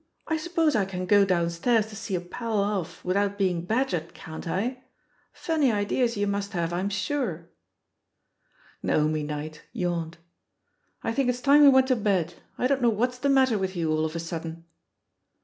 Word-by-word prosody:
I 320 - +1
suppose 325 -2 +1
I 205 -3 +2
can 185 -1 -4
go 205 +2 +5
downstairs 185 +5 +1
to 215 - -10
see 220 -2 -4
a - - 0
pal 225 +5 -4
off 200 -4 -2
without 200 +2 0
being 180 -4 0
badgered, 190 - -1
can't 160 +1 -8
I? 245 +9 -2 0.5
Funny 310 -6 +1
ideas 225 +3 0
you 205 - +1
must 200 0 -2
have, 170 -1 -1
I'm 185 +3 -1
sure!" 195 - -3 1.3
iNaomi 155 0 +1
Knight 150 +1 -5
yawned* 170 -2 -2 0.9
"I 225 - -1
think 270 0 +1
it's 250 0 0
time 280 +4 +5
we 285 - +9
(Went 265 -1 +5
to 255 - +4
bed. 190 -6 0 0.2
I - - 0
don't 270 0 +2
know 240 - +4
what's 245 +3 -1
the 280 - +1
matter 260 -5 +4
ynth 190 0 -3
you 165 -2 0
all 155 0 +1
of 160 +1 -3
a - - -2
sudden." 165 0 -6
200 Hz, 180 wpm, -26 LUFS, 170-245 Hz, 1.3 s, we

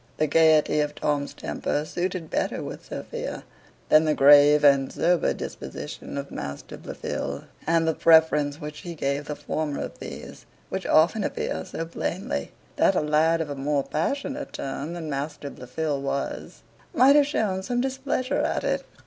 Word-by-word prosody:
The 155 - +2
gaiety 155 0 +4
of 150 0 -1
Tom's 145 -1 -1
temper 150 +1 -2
suited 175 0 -3
better - - -1
with - - -8
Sophia, - - -6 0.5
than 155 +1 +6
the 155 -1 +2
grave 145 +1 +7
and 140 -2 +5
sober 175 0 +2
disposition - - -7
of 140 0 -5
Master 70 0 -6
Blifil. - - -5 0.2
And 165 0 +3
the 160 - +3
preference 150 -3 +4
which 150 -1 -7
she 170 +1 -7
gave 140 -1 -1
the 150 - -4
former 145 0 -3
of - - -7
these, - - -9 0.2
would 190 -2 -3
often 170 +7 +4
appear - - -2
so 165 - -5
plainly, 190 - -3 0.3
that 195 - +4
a - - +2
lad 155 +2 +2
of 150 -2 -4
a - - -3
more 140 +1 0
passionate 280 - -3
turn 140 +4 -4
than 170 -2 -5
Master 145 0 -4
Blifil 140 +3 -3
was, 140 0 -4 0.3
might 270 +3 +6
have 290 -1 +5
shown 205 -9 0
some 245 +5 -2
displeasure 265 +1 -1
at - - -1
it. - - 0
155 Hz, 165 wpm, -25 LUFS, 145-175 Hz, 0.5 s, grave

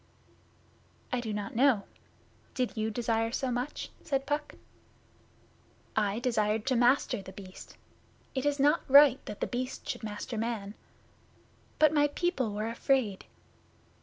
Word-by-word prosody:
'I 250 - +1
do 230 -3 -4
not 205 0 -4
know. 245 -4 +4 0.7
Did 255 -2 -1
you 220 0 -1
desire 225 0 0
so 255 +1 -1
much?' 245 +4 -3
said 275 -3 -1
Puck. 295 +1 -2 1.4
'I 205 -1 +1
desired 220 -3 0
to 260 - +1
master 245 -3 +3
The 190 - -10
Beast. 190 -1 -12 0.6
It 265 - -2
is 290 0 0
not 295 +4 +4
right 280 -1 +7
that 210 - -7
The - - +2
Beast 255 +2 -4
should - - -3
master 215 +1 -5
man. 220 -3 -3 1.0
But 310 -1 +5
my 290 -1 +4
people 290 - -1
were 210 +2 -3
afraid. 230 -3 0
240 Hz, 135 wpm, -30 LUFS, 215-275 Hz, 1.4 s, right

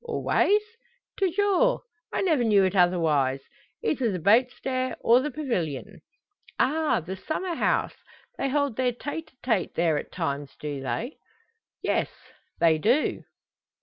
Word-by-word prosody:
"Always?" 425 -2 +2 0.5
"Toujours! 405 +6 +2 0.3
I - - -1
never 315 -9 +2
knew 210 -4 +4
it 190 +1 +1
otherwise. 155 -7 +2 0.4
Either 260 - +1
the 185 - -2
boat 220 +9 +4
stair, 255 0 -3
or 235 +2 +5
the 285 +3 -2
pavilion." 230 - -3 0.6
"Ah! 305 - +2
the 180 +4 -6
summer 340 - -3
house! - - 0 0.4
They 275 - -1
hold 285 -4 0
their 250 -1 +1
tete 295 +6 -6
a - - -38
tete 220 -8 0
there 165 -3 +2
at - - -9
times; 140 0 -3
do 145 -2 -4
they?" 135 - -4 0.6
"Yes; - - +1 0.5
they 160 -2 +4
do." 245 - +1
245 Hz, 140 wpm, -26 LUFS, -, 0.6 s, or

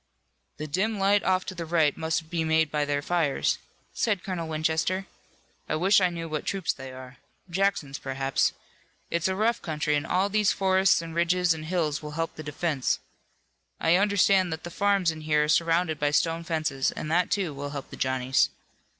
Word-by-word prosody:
"The 155 - -5
dim 195 +9 -1
light 200 +1 +3
off 185 0 +1
to 185 - -5
the 170 -2 -5
right 160 -3 +2
must 160 0 -2
be 165 -2 0
made 160 -1 +2
by 150 -1 0
their 145 0 -1
fires," 160 -4 +1 0.3
said 205 -6 0
Colonel 180 -4 -4
Winchester. 160 +4 0 0.6
"I - - +1
wish 190 +5 +4
I 180 - +4
knew 165 -1 -5
what 155 -1 -3
troops 195 -4 0
they 135 -1 -9
are. 130 0 -11 0.3
Jackson's 180 -7 0
perhaps. 135 0 0 0.6
It's 170 +1 +1
a 190 - -1
rough 230 +4 +1
country, 150 -1 -1
and 145 -1 0
all 185 +2 +2
these 210 0 +2
forests 190 -2 +3
and 165 -1 -7
ridges 175 +1 +2
and 155 -1 -7
hills 155 -4 -1
will 150 0 -7
help 165 0 -2
the - - -8
defense. 150 -2 -1 0.8
I 165 +1 +3
understand 195 -2 +3
that 160 0 -5
the 175 - -7
farms 200 -3 +2
in 160 -1 -8
here 150 -1 +2
are - - -1
surrounded 165 0 +2
by 145 - +2
stone 165 +2 +1
fences 155 -5 0
and 155 - -5
that, 175 +1 +2
too, 185 -7 -1
will 140 +1 -5
help 140 -1 -7
the - - -7
Johnnies." 130 0 +1
165 Hz, 195 wpm, -27 LUFS, 150-185 Hz, 0.8 s, wish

